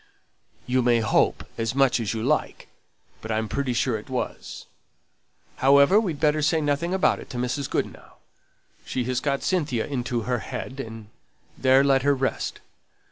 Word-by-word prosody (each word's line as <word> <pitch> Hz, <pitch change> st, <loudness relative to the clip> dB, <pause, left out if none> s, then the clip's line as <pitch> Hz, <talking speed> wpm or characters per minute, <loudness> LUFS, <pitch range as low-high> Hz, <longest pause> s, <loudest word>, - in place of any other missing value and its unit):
"You 130 Hz, +1 st, +1 dB
may 120 Hz, -1 st, +3 dB
hope 110 Hz, -, +1 dB
as 115 Hz, +2 st, -1 dB
much 135 Hz, -2 st, +3 dB
as 110 Hz, -4 st, -2 dB
you 110 Hz, -1 st, -3 dB
like, 150 Hz, +5 st, -1 dB, 0.5 s
but 110 Hz, -, -5 dB
I'm 110 Hz, 0 st, -1 dB
pretty 135 Hz, +1 st, -2 dB
sure 120 Hz, -2 st, 0 dB
it 105 Hz, -, -15 dB
was. 130 Hz, -1 st, -5 dB, 0.9 s
However, 140 Hz, +8 st, +5 dB
we'd 175 Hz, -10 st, -2 dB
better 150 Hz, 0 st, +2 dB
say 155 Hz, +2 st, +2 dB
nothing 145 Hz, +3 st, -1 dB
about 190 Hz, 0 st, +2 dB
it -, -, -11 dB
to 125 Hz, -, -6 dB
Mrs. 125 Hz, +3 st, -2 dB
Goodenough; -, -, -4 dB, 0.7 s
she 130 Hz, -, -2 dB
has 125 Hz, 0 st, -1 dB
got 140 Hz, 0 st, -1 dB
Cynthia 150 Hz, -, 0 dB
into 125 Hz, -3 st, -2 dB
her 125 Hz, +2 st, -1 dB
head, 130 Hz, +3 st, -6 dB
and 110 Hz, -4 st, -8 dB, 0.5 s
there 130 Hz, +1 st, +4 dB
let 135 Hz, -1 st, +3 dB
her 140 Hz, +1 st, +3 dB
rest. 130 Hz, 0 st, -2 dB
130 Hz, 165 wpm, -25 LUFS, 120-145 Hz, 0.9 s, However